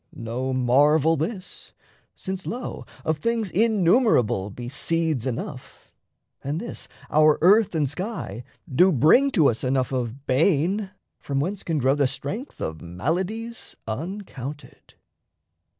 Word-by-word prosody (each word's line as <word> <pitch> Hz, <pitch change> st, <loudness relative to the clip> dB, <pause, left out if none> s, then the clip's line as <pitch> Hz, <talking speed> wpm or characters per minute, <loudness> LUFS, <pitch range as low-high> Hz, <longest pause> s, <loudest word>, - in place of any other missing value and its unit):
No 120 Hz, +3 st, -3 dB
marvel 145 Hz, +5 st, +4 dB
this, 185 Hz, +6 st, -5 dB, 0.4 s
since, 190 Hz, 0 st, -5 dB
lo, 245 Hz, +3 st, -5 dB, 0.2 s
Of 155 Hz, -1 st, 0 dB
things 230 Hz, -1 st, -1 dB
innumerable 185 Hz, -, +3 dB
be 120 Hz, +4 st, -8 dB
seeds 160 Hz, -1 st, -1 dB
enough, 130 Hz, +2 st, -6 dB, 0.5 s
And 145 Hz, +4 st, -2 dB
this 235 Hz, -, -6 dB, 0.2 s
our 155 Hz, 0 st, +5 dB
earth 195 Hz, +2 st, +5 dB
and 150 Hz, -3 st, +2 dB
sky 145 Hz, -, -5 dB, 0.2 s
do 180 Hz, +8 st, +4 dB
bring 165 Hz, -, +5 dB
to 160 Hz, -9 st, +5 dB
us 115 Hz, -, 0 dB
Enough 130 Hz, 0 st, 0 dB
of 130 Hz, +1 st, -3 dB
bane 175 Hz, +8 st, +2 dB, 0.3 s
from 140 Hz, -1 st, -2 dB
whence 185 Hz, +7 st, -2 dB
can 165 Hz, -2 st, -2 dB
grow 135 Hz, -1 st, +3 dB
the 145 Hz, -2 st, +2 dB
strength 210 Hz, -, -5 dB
Of 80 Hz, 0 st, -4 dB
maladies 180 Hz, -, -3 dB
uncounted. 150 Hz, -, -7 dB
155 Hz, 125 wpm, -24 LUFS, 130-190 Hz, 0.5 s, our